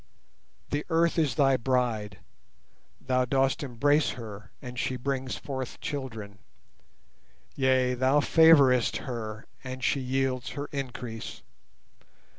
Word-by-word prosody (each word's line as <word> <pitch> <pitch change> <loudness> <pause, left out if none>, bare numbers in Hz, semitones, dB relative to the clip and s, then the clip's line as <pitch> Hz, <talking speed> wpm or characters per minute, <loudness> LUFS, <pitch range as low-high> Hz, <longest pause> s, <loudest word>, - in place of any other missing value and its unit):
The 145 +1 0
Earth 165 0 +2
is 155 -4 +1
thy 135 -3 +4
bride. 115 -5 -1 0.8
Thou 130 -1 +1
dost 135 +1 +1
embrace 145 +3 +2
her 105 -3 -9
and 125 -3 -7
she 130 - -1
brings 130 0 -2
forth 130 -3 -5
children; 115 -10 -6 1.2
Yea, 130 -2 +2
Thou 130 +3 +3
favourest 140 -6 +5
her, 110 -3 -5 0.2
and 130 0 -6
she 140 - +2
yields 130 -1 -1
her 145 - -2
increase. 125 -5 -6
130 Hz, 110 wpm, -28 LUFS, 120-140 Hz, 1.2 s, favourest